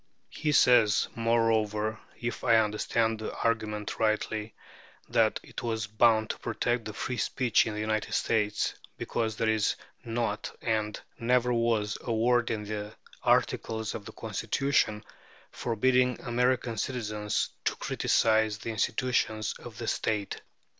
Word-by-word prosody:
He 155 -1 -1
says, 120 -7 +5
moreover, 110 -2 +1 0.2
if 120 -1 -4
I 115 - +5
understand 110 +1 +1
the 110 - -5
argument 110 -2 -1
rightly, 110 0 0 0.5
that - - +2
it - - -8
was 110 -2 -2
bound 110 +1 +3
to - - -9
protect 120 -2 -1
free 125 - -3
speech 125 -2 +2
in 110 - -3
the 110 0 0
States 105 -2 +1 0.2
because 110 -1 -2
"there 110 - 0
is 110 -1 +2 0.3
not 115 -2 -3
and 110 -2 -1 0.2
never 125 +1 +2
was 115 -3 +1
a 120 - -4
word 120 +1 +2
in 110 -2 -2
the 105 0 -5 0.3
Articles 110 -1 +1
of 100 - -7
the - - -8
Constitution 110 0 0 0.5
forbidding 125 +2 +1
American 120 -1 0
citizens 105 -5 -1 0.2
to - - +1
criticize 110 -1 +2
the 115 +1 -5
institutions 110 -1 0
of 115 -4 -10
the 115 - -5
State." 105 -3 -1
110 Hz, 130 wpm, -29 LUFS, 105-120 Hz, 0.5 s, says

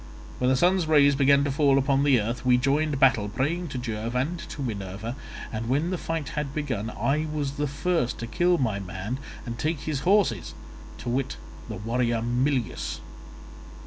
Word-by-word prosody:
When 125 - +2
the 130 - +4
sun's 175 +4 +3
rays 145 -2 +6
began 140 0 +4
to 140 - 0
fall 140 -1 +3
upon 135 0 +2
the 140 -4 +5
earth 115 +4 -3
we 125 -1 +5
joined 140 +2 +1
battle, 115 -6 +4
praying 155 +11 -1
to 135 - -5
Jove 115 -1 -3
and 150 +8 0
to 140 - -5
Minerva, 105 0 -4 0.4
and 115 +1 -3
when 150 +7 +1
the 185 - -1
fight 165 -4 -3
had 150 -2 -4
begun, 130 -8 -2
I 150 +6 0
was 145 -3 -1
the 145 +1 -2
first 145 -3 0
to 115 - -5
kill 175 +9 +2
my 110 -8 0
man 95 +6 -5 0.3
and 115 -1 -5
take 155 -1 -1
his 150 -3 -2
horses—to 160 - -1
wit 125 +2 -1 0.3
the - - -4
warrior 115 +2 0
Mulius. 125 +1 -1
135 Hz, 175 wpm, -26 LUFS, 115-150 Hz, 0.4 s, rays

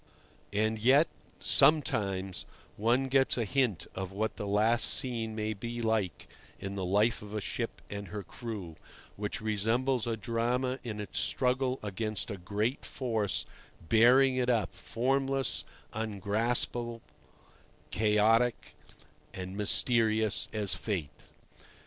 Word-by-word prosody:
And 110 +2 0
yet 135 +8 +5 0.3
sometimes 100 - +2 0.3
one 120 +5 +2
gets 135 0 +3
a 115 - 0
hint 125 -5 0
of 95 -1 -5
what 110 +3 -2
the 105 - -5
last 110 +3 +2
scene 115 -5 0
may 110 0 -2
be 120 +4 -5
like 110 -8 -1 0.3
in 95 0 -5
the 95 -1 -3
life 105 +5 +2
of 105 0 -8
a - - 0
ship 105 +4 -4
and 100 0 -6
her 105 -1 -6
crew, 100 -5 -7 0.4
which 105 +2 -3
resembles 115 +4 +1
a 115 -1 -1
drama 125 +4 -1
in 110 -4 -5
its 105 - -3
struggle 130 0 +1
against 110 +2 -3
a 100 - -4
great 105 +8 -2
force 115 -6 -1 0.4
bearing 130 +4 +5
it 125 -1 +1
up, 115 -4 +1
formless, 135 +2 0 0.3
ungraspable, 110 +3 -1 0.9
chaotic 110 +4 +2 0.6
and 95 0 -6
mysterious, 110 0 +2
as 105 -3 0
fate. 90 -10 -2
110 Hz, 125 wpm, -30 LUFS, 105-120 Hz, 0.9 s, yet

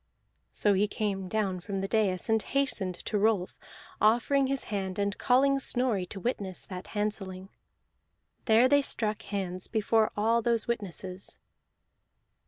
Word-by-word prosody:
So 205 - +2
he 200 +2 +2
came 200 -3 -2
down 195 -4 -1
from 195 +2 -4
the 195 - -2
dais, 195 -4 +1
and 220 -1 +2
hastened 215 -10 0
to 210 - 0
Rolf, 205 -3 +1 0.5
offering 240 +6 +3
his 275 0 -1
hand 190 -2 -2
and 200 0 0
calling 275 +2 +3
Snorri 245 -8 0
to 195 - -7
witness 195 -4 -3
that 185 -1 -8
handselling. 195 -3 -3 1.0
There 225 +2 +5
they 285 +2 +4
struck 215 -5 -1
hands 185 -3 -4
before 220 0 +2
all 225 +3 +2
those 230 -1 +1
witnesses. 195 -4 -4
210 Hz, 140 wpm, -29 LUFS, 190-230 Hz, 1.0 s, There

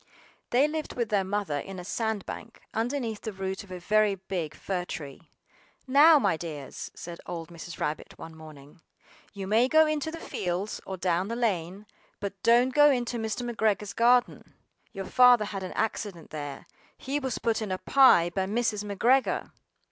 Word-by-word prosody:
They 260 +5 +4
lived 310 0 -4
with 235 -3 -1
their 205 -2 +2
Mother 190 -6 -2
in 195 +5 -7
a 180 - -7
sand 220 0 -2
bank, 230 - -8
underneath 230 -1 -2
the 220 - -4
root 190 0 -4
of 200 - -17
a 185 - -6
very 210 +2 +2
big 180 -5 -5
fir 185 -2 -3
tree. 145 -6 -8 0.6
"NOW, 295 +4 +7
my 200 - +1
dears," 150 -5 -7
said 170 0 -8
old 165 -1 -6
Mrs. 170 0 -9
Rabbit 150 +1 -4
one 160 0 -10
morning, 155 0 -14 0.5
"you 200 -2 -6
may 220 +5 +3
go 315 +3 +5
into 305 0 -1
the 325 - -6
fields 185 - -3
or 190 - -4
down 180 +1 0
the 230 - -3
lane, 200 -4 -2 0.3
but 200 -1 -6
don't 245 +2 +4
go 295 +1 +7
into 245 -3 0
Mr. 225 +2 -3
McGregor's 215 -3 0
garden: 245 +1 +2 0.4
your 195 -2 -6
Father 245 0 +6
had 200 -2 -5
an 185 - -6
accident 205 -6 -3
there; 145 -2 -6 0.3
he 280 +2 -2
was 260 -4 -3
put 230 -1 0
in 210 -3 -3
a 185 - -1
pie 185 -9 +5
by 190 +1 -1
Mrs. 215 -1 0
McGregor." 235 +6 +1
205 Hz, 180 wpm, -28 LUFS, 180-240 Hz, 0.6 s, NOW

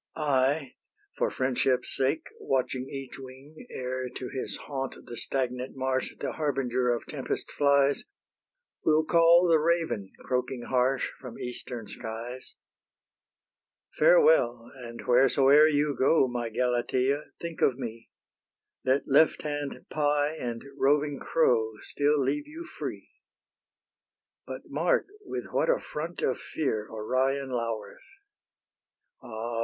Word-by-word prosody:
I, 140 -1 +1 0.4
for - - +1
friendship's 130 0 0
sake, 135 +4 0
Watching 130 -1 -1
each 135 -1 -7
wing, 135 - -12
Ere 130 0 -4
to 125 0 -6
his 130 - -4
haunt, 135 -2 -4
the 120 - -8
stagnant 125 +1 -3
marsh, 130 0 -1
The - - -2
harbinger 130 -4 0
of 120 -1 0
tempest - - -4
flies, 140 -1 +3 0.8
Will 155 0 +4
call 170 +2 +6
the 165 -2 +5
raven, 160 - 0
croaking 125 -1 -1
harsh, 130 +2 +1
From 125 -3 -9
eastern 125 -1 -6
skies. 115 +4 -7 1.4
Farewell! 455 - +4
and 120 -2 -9
wheresoe'er 135 +4 +5
you 145 -1 +1
go, 135 +2 +4
My 120 -2 -3
Galatea, 125 +4 +1 0.2
think 170 -1 -6
of 125 - +3
me: 115 -3 -7 0.7
Let 130 +2 +2
lefthand 145 0 +1
pie 150 0 +1
and 120 -5 -4 0.2
roving 145 0 +2
crow 115 -8 +2
Still 145 +1 +1
leave 295 - 0
you 325 +3 -8
free. - - -7 1.4
But - - -6
mark - - +1 0.2
with - - -4
what - - +1
a - - +3
front 165 +3 -5
of 130 - +1
fear 110 -9 -2
Orion 130 +5 -1
lowers. 115 -3 -3 1.2
Ah! 115 -1 -5
130 Hz, 120 wpm, -28 LUFS, 125-150 Hz, 1.4 s, call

